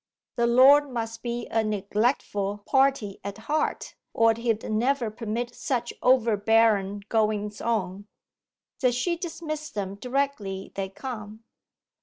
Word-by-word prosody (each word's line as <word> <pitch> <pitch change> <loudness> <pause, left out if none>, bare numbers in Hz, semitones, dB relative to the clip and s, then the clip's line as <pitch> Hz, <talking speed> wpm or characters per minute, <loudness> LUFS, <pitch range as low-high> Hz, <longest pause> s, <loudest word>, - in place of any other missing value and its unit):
The 235 0 +2
Lord 275 +4 +6
must 225 -2 -4
be 240 0 -3
a 225 0 +2
neglectful 205 -1 -1
party 265 -7 +2
at 200 +1 -5
heart, 295 +8 -2 0.2
or 225 0 +5
he'd 230 -1 -1
never 240 +1 +1
permit 230 +2 -4
such 240 -2 -2
overbearen 220 -4 +3
goings 210 -2 0
on!' 200 -3 -2 0.7
'Does 250 -3 +2
she 340 +8 0
dismiss 315 -3 -5
them 195 -2 -4
directly 225 -5 -3
they 195 -1 -3
come! 215 -1 -8
225 Hz, 120 wpm, -26 LUFS, 205-255 Hz, 0.7 s, Lord